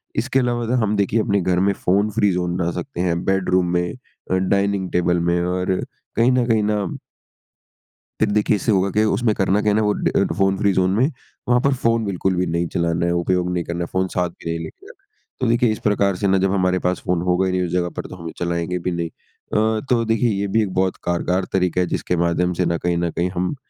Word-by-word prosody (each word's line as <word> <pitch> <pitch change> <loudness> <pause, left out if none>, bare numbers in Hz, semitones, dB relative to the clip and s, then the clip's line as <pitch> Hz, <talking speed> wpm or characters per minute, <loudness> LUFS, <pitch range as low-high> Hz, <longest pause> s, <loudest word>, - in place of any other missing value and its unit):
इसके 130 +4 +1
अलावा 120 -2 0
तो 120 - 0
हम 105 0 +1
देखिए 100 +2 +1
अपने 100 -2 +1
घर 90 0 +1
में 100 +1 +3
फ़ोन-फ्री 105 +3 +1
ज़ोन 90 -1 -1
बना 85 -2 0
सकते 135 -5 -5
हैं 85 -1 0
बेडरूम 95 -1 +2
में 90 0 0
अ, 125 -6 -10
डाइनिंग 100 0 +1
टेबल 90 0 +2
में 85 0 +2
और 90 +1 0 0.4
कहीं 120 +3 +4
न 125 -1 +2
कहीं 110 -3 +2
ना 105 -1 0 1.4
फिर 110 -1 +2
देखिए, 105 0 +2
इससे 110 - 0
होगा 95 0 +2
क्या? 105 +3 +2
उसमें 110 +1 +1
करना 95 +2 +1
क्या 105 - +2
है - - +2
ना? 110 - +3
वो 105 - +2
ड - - 0
फ़ोन 95 0 +2
फ्री 100 +1 +2
ज़ोन 95 +3 +2
है। 140 +6 +3 0.4
वहाँ 125 0 +5
पर 140 -1 +2
फ़ोन 115 -3 +1
बिल्कुल 95 -1 -1
भी 90 +1 +1
नहीं 85 0 -1
चलाना 85 0 +1
है, 85 - +1
उपयोग 90 +1 0
नहीं 90 -1 -1
करना 85 +1 -5
है। - - -2
फ़ोन 95 0 +1
साथ 90 -1 +1
भी 85 - -9
नहीं 85 0 -2
लेके 80 - -11
जाना - - -16
है। - - -43 0.3
तो 130 - 0
देखिए 120 0 +3
इस 110 - -3
प्रकार 100 -2 +2
से 100 +2 -1
ना, 95 0 +3
जब 95 0 +1
हमारे 90 -1 +1
पास 90 0 -1
फ़ोन 90 -2 +1
होगा 90 +1 +1
ही 95 - 0
नहीं 90 0 0
उस 85 - -5
जगह 90 -1 0
पर, - - -4
तो - - -9
हम 85 -2 -7
चलाएँगे 85 +1 -2
भी 90 - -2
नहीं। 85 -1 -2
अ, 110 +5 -2
तो 120 -2 +3
देखिए 115 +2 +1
ये 100 0 -1
भी 110 - +5
एक 95 -3 -4
बहुत 95 0 0
कारगर 90 +2 0
तरीका 90 -1 +1
है, 90 - 0
जिसके 90 - -1
माध्यम 85 +1 +1
से - - +2
ना 85 0 0
कहीं 85 0 -1
न 85 0 0
कहीं 85 +1 -1
हम 90 +9 -1
95 Hz, 250 wpm, -21 LUFS, 90-105 Hz, 1.4 s, वहाँ